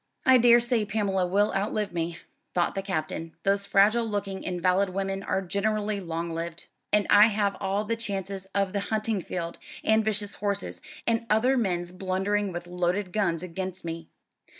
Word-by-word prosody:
"I 260 -1 +7
daresay 240 -1 +5
Pamela 200 -3 0
will 205 +3 +2
outlive 205 0 -1
me," 170 0 -2 0.4
thought 175 -1 +2
the 195 - -2
Captain; 165 -3 -3
"those 200 0 +1
fragile 215 +4 +4
looking 205 -3 -3
invalid 185 +2 +1
women 195 +1 -2
are 195 -1 -1
generally 210 +2 -1
long 170 -2 -4
lived. 165 0 -5 0.3
And 210 -1 +4
I 205 +1 +9
have 205 -2 0
all 200 +2 -1
the 230 - 0
chances 195 -3 -4
of 195 -1 +1
the 200 - 0
hunting 215 -2 0
field, 170 -1 -5 0.2
and 220 0 +4
vicious 210 -1 -1
horses, 200 -1 -3 0.2
and 230 0 0
other 240 +5 +3
men's 180 -7 0
blundering 190 +2 -1
with 175 0 -5
loaded 180 +2 -1
guns, 180 -6 0
against 185 +1 -5
me. 165 0 -5
195 Hz, 165 wpm, -27 LUFS, 180-210 Hz, 0.4 s, I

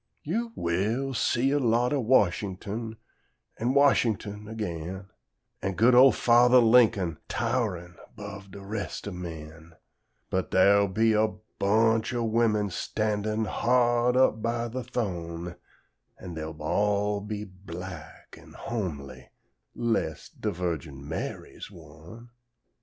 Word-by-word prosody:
You 230 +9 -2
will 110 +11 -1
see 125 +2 +1
a 145 - +2
lot 120 +1 +2
o' 145 - +1
Washington, 110 -1 0 0.6
an' 125 +4 0
Washington 110 -7 +2
again; 95 -3 -5 0.5
An' 95 - -2
good 120 +5 +4
ol' 130 +2 +8
Fathah 120 +2 +5
Lincoln, 110 -9 +4
tow'rin' 105 -8 -2 0.2
'bove 100 -1 -9
de 100 +1 -10
rest 105 0 -5
o' - - -4
men; 80 -2 -9 0.6
But 95 0 -1
dar'll 100 +2 +5
be 110 +4 +2
a 110 +1 +3 0.3
bunch 110 +3 +2
o' 120 - 0
women 110 -3 +1
standin' 110 +3 -1
hard 120 +2 +2
up 120 -4 +3
by 115 +1 -1
de 130 +3 -4
th'one, 90 -8 -4 0.6
An' 90 -2 -8
dey'll 80 -1 -6
all 105 +5 0
be 105 0 -5
black 95 -4 -10
an' - - -16
homely, 70 - -5 0.5
'less 110 -10 -2
de - - -4
Virgin 80 -6 -4
Mary's 80 - -6
one. 115 +9 -14
105 Hz, 120 wpm, -27 LUFS, 90-120 Hz, 0.6 s, ol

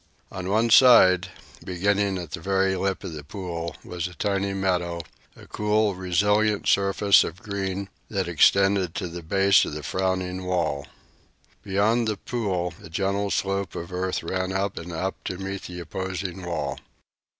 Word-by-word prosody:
On 95 0 -5
one 110 +3 +2
side, 100 -8 +7 0.4
beginning 100 +2 0
at 85 -4 -7
the - - -4
very 95 +2 +1
lip 95 +1 -2
of 90 -4 -6
the 75 -1 -7
pool, 85 -1 -5
was 90 -1 -4
a 90 - -12
tiny 100 0 -1
meadow, 90 -3 -1 0.3
a - - -14
cool, 105 0 +1
resilient 105 +4 +1
surface 100 0 +4
of 85 +4 -7
green 100 -1 -3 0.2
that 95 -4 -1
extended 95 +2 +3
to 95 - -3
the 85 +1 -7
base 95 +4 +4
of - - -4
the 75 0 -6
frowning 95 0 -1
wall. 85 -6 -1 0.7
Beyond 110 +4 +1
the 105 -2 -1
pool 95 -8 -2
a - - -10
gentle 100 +4 -1
slope 100 0 -1
of 85 +2 -6
earth 90 0 -2
ran 95 +2 -2
up 95 +1 -1
and 85 +2 -8
up 95 +4 -4
to 95 - -3
meet 95 0 -5
the 90 0 -7
opposing 95 +1 -5
wall. 70 -5 -3
95 Hz, 160 wpm, -25 LUFS, 90-100 Hz, 0.7 s, side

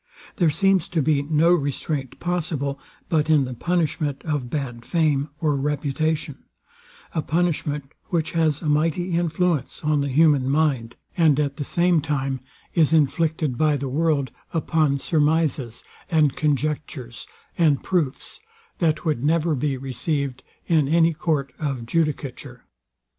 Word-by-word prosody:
There 170 -3 +4
seems 195 +2 +2
to 175 -3 0
be 145 0 +2
no 155 +3 +3
restraint 145 -3 -2
possible, 155 -6 -2 0.3
but 155 -1 +1
in 150 -4 +4
the 125 - -5
punishment 155 -1 -1
of 145 -6 -2
bad 125 -5 -4
fame 150 -2 +1
or 150 -3 +1
reputation; 150 +2 -1 0.7
a 160 - 0
punishment, 150 -3 -1
which 165 -3 -1
has 160 -2 +1
a - - -5
mighty 160 +4 +1
influence 170 -4 0
on 150 -1 +2
the 140 - -1
human 140 -2 +4
mind, 135 -6 +1 0.2
and 155 -5 +4
at 140 -2 -1
the 145 - -2
same 170 +2 +2
time 135 -3 -2 0.3
is 160 -2 +3
inflicted 155 -2 +1
by 155 -2 +3
the 135 -1 -4
world 145 -3 +1 0.2
upon 155 -3 +2
surmizes, 150 -5 0 0.3
and 155 -5 +3
conjectures, 145 -4 -2 0.3
and 155 -5 +2
proofs, 155 -7 -1 0.4
that 165 -1 +1
would 150 -6 0
never 160 +2 +2
be 140 0 -1
received 135 +1 -2 0.2
in 155 -5 +2
any 165 +2 +4
court 150 -4 -1
of 135 -6 -3
judicature. 140 -3 -2
150 Hz, 135 wpm, -23 LUFS, 140-160 Hz, 0.7 s, There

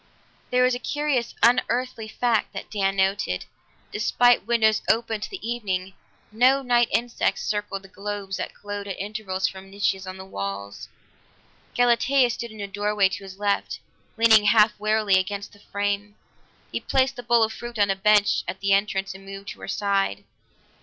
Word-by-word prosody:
There 250 0 +3
was 255 0 +3
a 245 - -2
curious, 290 -4 -1
unearthly 245 -1 +2
fact 230 0 0
that - - -7
Dan 195 -2 0
noted; 190 - 0 0.5
despite 240 +2 +3
windows 220 -2 +3
open 225 -1 +1
to - - -4
the 385 - -7
evening, 195 -6 -3 0.4
no 255 +5 +4
night 240 -2 +3
insects 235 +1 0
circled 205 -2 -3
the - - -12
globes 200 0 -5
that - - -5
glowed 205 0 -6
at 195 - -5
intervals 200 -2 -2
from 190 0 -9
niches 195 -1 -1
in 185 0 -6
the 190 - -9
walls. 100 - -6 0.9
Galatea 245 +1 +3
stood 235 0 -5
in 215 -1 -10
a 200 - -3
doorway 205 0 +1
to 190 +1 -6
his 190 0 -10
left, 205 -1 -1 0.4
leaning 220 -2 +6
half 210 0 +6
wearily 215 -2 +3
against 200 +2 -4
the 205 - -18
frame; 205 0 -3 0.6
he - - -2
placed 265 0 +1
the 245 - -6
bowl 235 -1 +3
of 220 0 0
fruit 240 0 -8
on 200 -1 +3
a - - 0
bench 205 +1 +3
at 190 - -4
the 195 0 +2
entrance 195 -1 0
and 195 0 -13
moved 195 0 -9
to - - -9
her - - -7
side. 195 - 0
205 Hz, 175 wpm, -24 LUFS, 195-235 Hz, 0.9 s, leaning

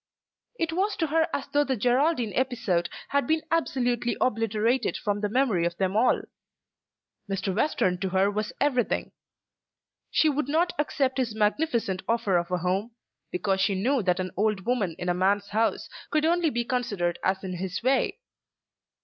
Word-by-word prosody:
It 330 -3 -1
was 395 +4 0
to 325 - 0
her 320 +1 +2
as 275 - -2
though 290 +1 +3
the 270 -2 -1
Geraldine 245 +1 +1
episode 230 -10 0 0.2
had 280 0 +1
been 315 0 +1
absolutely 245 -7 0
obliterated 225 +1 +1
from 205 -1 -2
the 210 - 0
memory 225 -7 +2
of 170 0 -1
them 190 0 0
all. 240 +3 +3 1.1
Mr. 195 -1 -2
Western 185 -8 +1
to 190 - -1
her 190 +2 +2
was 210 +1 -2
everything. 255 -5 0 1.0
She 315 - +3
would 290 -2 0
not 340 +4 +2
accept 270 -3 0
his 235 -4 -1
magnificent 220 -3 0
offer 215 -5 +2
of 170 - -5
a 180 - 0
home, 190 +6 -2 0.4
because 190 +1 0
she 195 +1 +2
knew 250 +7 +1
that 180 -2 +1
an 185 -1 -3
old 205 -1 0
woman 215 -9 0
in 180 - -5
a 175 - +2
man's 200 +3 +1
house 220 +2 0 0.2
could 305 0 +1
only 340 0 +3
be 240 -3 -2
considered 210 -9 -1
as 190 +1 0
in 185 -2 -4
his 185 +3 -4
way. 270 - +2
225 Hz, 170 wpm, -27 LUFS, 190-270 Hz, 1.1 s, though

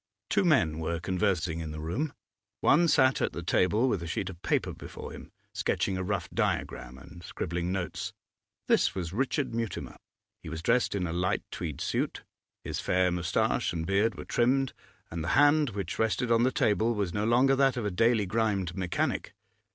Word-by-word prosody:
Two - - +3
men 85 - +3
were 80 +1 -2
conversing 90 -2 0
in 80 -1 -4
the 75 0 -6
room. 90 - -2 0.5
One 170 +4 +5
sat 130 -4 +4
at - - 0
the 85 - -5
table 105 +8 +2
with 100 -8 0
a 85 - -5
sheet 90 +3 -2
of 85 -1 -14
paper - - 0
before - - -9
him, - - -11 0.2
sketching 95 - 0
a 95 - -2
rough 95 -3 -2
diagram 60 +1 -2
and 85 +6 -13
scribbling 85 +1 -3
notes; 95 +2 -3 0.6
this - - +3
was 90 -2 -4
Richard 135 +3 -1
Mutimer. 115 -5 -4 0.4
He - - -8
was 80 0 -6
dressed 115 0 +2
in 95 -3 0
a 80 - -3
light 90 +1 0
tweed 80 -5 -5
suit; - - -2 0.4
his - - -4
fair 90 0 +2
moustache 85 0 0
and 80 -1 -3
beard 100 +3 +2
were - - -8
trimmed, 130 +2 +1 0.4
and 80 -1 -3
the - - -4
hand 145 0 +5
which 100 -5 -5
rested 115 +2 +1
on 115 0 +4
the 130 +2 +3
table 110 0 +2
was 100 -5 -1
no 105 - -1
longer 125 +4 +4
that 135 -1 +3
of 115 - -2
a 105 - 0
daily 115 +3 +3
grimed 100 -4 0
mechanic. 90 -2 -2
95 Hz, 190 wpm, -29 LUFS, 85-120 Hz, 0.6 s, One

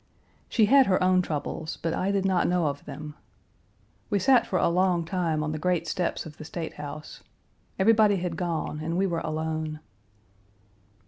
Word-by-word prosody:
She 220 - +4
had 270 +4 +6
her 185 -1 +2
own 185 0 +4
troubles, 155 -1 -4
but 165 0 -2
I 190 - -1
did 200 -1 0
not 185 -2 +2
know 175 -1 +1
of 145 -1 -3
them. 150 +1 -7 1.0
We 205 - +2
sat 240 +5 +4
for 185 - 0
a - - +3
long 175 -1 +2
time 165 -3 -1
on 155 - -2
the 155 - -4
great 180 +1 0
steps 180 -2 -2
of 150 -2 -10
the - - -8
State 160 +1 -5
House. 150 +1 -8 0.6
Everybody 210 0 +5
had 180 -2 -3
gone 165 -3 -3
and 165 +2 -2
we 195 - +2
were 170 -3 -1
alone. 155 0 -3
170 Hz, 180 wpm, -27 LUFS, 155-185 Hz, 1.0 s, had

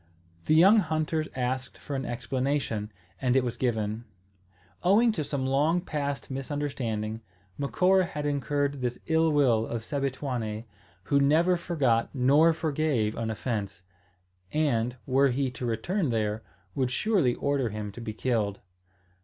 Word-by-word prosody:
The 155 - +4
young 190 +7 +7
hunters 155 -3 0
asked 130 +1 -2
for 145 - -6
an 135 -1 -3
explanation, 125 -3 -2 0.3
and 125 -1 +2
it 135 - +4
was 120 -1 -2
given. 110 -2 -1 0.8
Owing 215 +6 +4
to 165 -8 -2
some 140 -2 -2
long 145 +6 +2
past 145 -5 -4
misunderstanding, 130 -6 -3 0.4
Macora 185 +6 +3
had 150 -2 -5
incurred 145 -1 -1
this 125 -1 -2
ill 160 0 +3
will 125 -7 +3
of 115 -1 -4
Sebituane, 130 -5 -3 0.4
who 140 +8 +2
never 160 +6 +4
forgot 135 -10 +1
nor 140 +6 +5
forgave 155 -8 0
an 115 -1 -3
offence, 105 -4 -3 0.7
and, 125 -5 0
were 135 +2 +4
he 130 +1 0
to 125 -1 -5
return 155 - -1
there, 110 -2 -1 0.3
would 130 -3 0
surely 175 - +1
order 140 -4 0
him 105 -1 -5
to 110 - -10
be 110 - -4
killed. 110 -4 -1
135 Hz, 140 wpm, -28 LUFS, 115-150 Hz, 0.8 s, young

